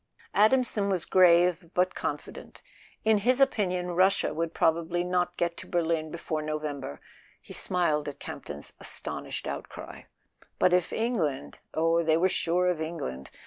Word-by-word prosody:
Adamson 215 -2 +3
was 185 -4 0
grave 175 -1 +4
but 185 +1 +2
confident. - - -6 0.4
In 220 -1 +4
his 250 +5 +2
opinion 180 -9 +1
Russia 190 +3 +3
would 165 0 -2
probably 170 +2 +1
not 180 0 0
get 170 0 0
to - - -8
Berlin 165 -2 0
before 155 -1 -3
November 150 - -4 0.4
(he - - -12
smiled 160 -5 +1
at 145 -1 -5
Campton's 75 - -8
astonished - - -5
out¬ - - -4
cry); - - -10 0.5
but 180 - +3
if 180 -2 +2
England—oh, 165 - -1
they 160 -1 +3
were 180 +3 +3
sure 175 +1 +1
of 165 -3 -4
England! 70 - -5
170 Hz, 145 wpm, -28 LUFS, 155-185 Hz, 0.5 s, grave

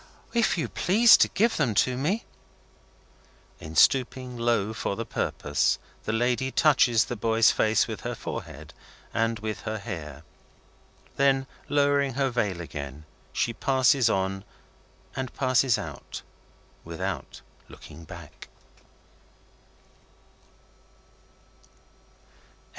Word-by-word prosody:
"If 235 -5 +2
you 160 - -1
please 220 +6 +5
to - - +4
give 225 +3 +1
them 125 -9 +1
to 125 +4 +2
me." 170 - -1 1.3
In 80 +1 -9
stooping 130 - +3
low 115 -3 0
for 100 - -3
the 115 - -4
purpose, 75 -7 0 0.3
the - - -1
lady 120 +3 0
touches 130 -6 +4
the 120 - -4
boy's 115 +1 +3
face 110 0 +2
with - - -6
her - - -4
forehead - - -7 0.4
and 115 0 0
with 110 0 -5
her 110 0 -4
hair. 80 - -7 0.9
Then, 135 -1 +3 0.2
lowering 140 -2 +2
her 135 -1 +1
veil 100 -7 -1
again, 75 -2 -7 0.3
she 115 - -1
passes 130 0 +3
on, 95 -1 -1 0.7
and 130 -1 -4
passes 130 -2 +2
out - - -8 0.6
without 80 -1 -5 0.3
looking 80 +2 -12
back. 85 -3 -12
115 Hz, 110 wpm, -26 LUFS, 100-135 Hz, 1.3 s, please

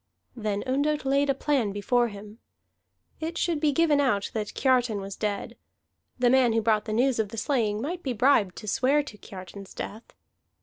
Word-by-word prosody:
Then 210 -3 -2
Ondott 285 +3 0
laid 280 +1 +2
a 275 - +2
plan 265 -7 0
before 240 +4 +1
him. 210 +1 -10 0.8
It 325 +2 -4
should 335 -3 0
be 300 -1 +2
given 300 0 +3
out 220 -8 0
that 215 -2 -4
Kiartan 250 -5 +2
was 195 0 -6
dead: 205 -2 -3 0.6
the 245 -1 +3
man 255 -3 +4
who 225 - +2
brought 215 -1 +2
the 220 - -4
news 245 +2 +2
of 215 -2 0
the 225 - -8
slaying 220 -4 0
might 340 +9 -4
be 265 - -2
bribed 230 -6 +3
to 215 - -9
swear 275 +7 +2
to 230 -7 -11
Kiartan's 190 +1 -10
death. 220 +3 -7
240 Hz, 185 wpm, -26 LUFS, 210-275 Hz, 0.8 s, man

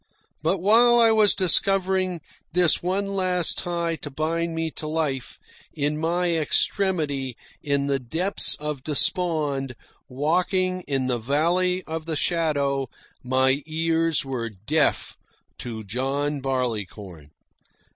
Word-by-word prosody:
But 195 - +1
while 235 +5 +5
I 230 -1 +6
was 215 -2 +4
discovering 185 -1 +2 0.3
this 175 -2 +3
one 195 +3 -1
last 185 -3 +1
tie 170 -1 -2
to 145 - -8
bind 165 +3 -2
me 165 0 -2
to 155 - -7
life, 150 -5 -2 0.4
in 145 +1 -1
my 170 +1 +1
extremity, 150 - 0 0.3
in 140 -2 0
the 140 -1 0
depths 165 +11 0
of 150 -3 -5
despond, 150 -4 +1 0.3
walking 185 +6 0
in 135 -2 -1
the 125 -2 -1
valley 175 +9 +1
of 160 0 -6
the 160 - -2
shadow, 145 -6 0 0.3
my 130 +2 +2
ears 165 -1 0
were 125 -4 -3
deaf 115 +10 0 0.4
to 115 -3 -6
John 135 +7 -2
Barleycorn. 105 - -4
155 Hz, 120 wpm, -24 LUFS, 135-180 Hz, 0.4 s, I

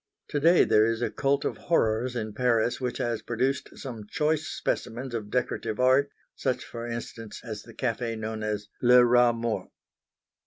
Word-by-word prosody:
To 145 - 0
day 170 +4 +6
there 110 +1 +4
is 115 +1 -1
a - - -1
cult 140 0 0
of - - -2
horrors 120 -5 +1
in 110 -3 -3
Paris 120 0 +1
which 125 -1 -2
has 115 -2 -1
produced 130 +4 -2
some 115 -6 -7
choice 155 0 0
specimens 120 +2 -3
of 110 -3 -4
decorative 120 -2 -2
art, 130 +3 +4 0.3
such 130 -2 -1
for 120 0 -6
instance 115 -1 -6
as 110 -3 -6
the - - -14
café 115 -2 -2
known 110 0 -4
as 105 -1 -3
Le 125 0 +7
Rat 120 0 +5
Mort. 115 -1 -2
120 Hz, 170 wpm, -27 LUFS, 110-130 Hz, 0.3 s, Le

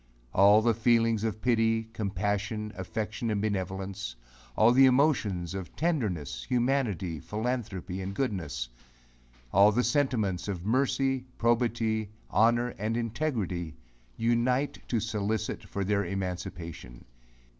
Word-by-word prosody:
All 100 +3 +6
the 115 0 +4
feelings 115 -1 +2
of 110 -1 -3
pity, 115 -2 +2
compassion, 105 +1 -2
affection, 110 +4 -3
and 105 -2 0
benevolence 95 - -3 0.4
all 110 +2 +6
the 135 +2 +7
emotions 120 - +2
of 95 -2 -6
tenderness, 105 - -1
humanity, 120 - 0
philanthropy, 105 - -3
and 95 +1 -5
goodness 85 - -2 0.9
all 100 +2 +7
the 120 +4 +1
sentiments 120 - 0
of 95 -3 -4
mercy, 135 +2 +1
probity, 115 -2 +1 0.2
honour, 120 +3 +3
and 110 +3 -1
integrity, 110 - -2 0.4
unite 120 +4 +1
to 115 - +1
solicit 110 0 -2
for 100 - -2
their 100 +1 +1
emancipation. 90 -8 -5
110 Hz, 115 wpm, -29 LUFS, 95-120 Hz, 0.9 s, the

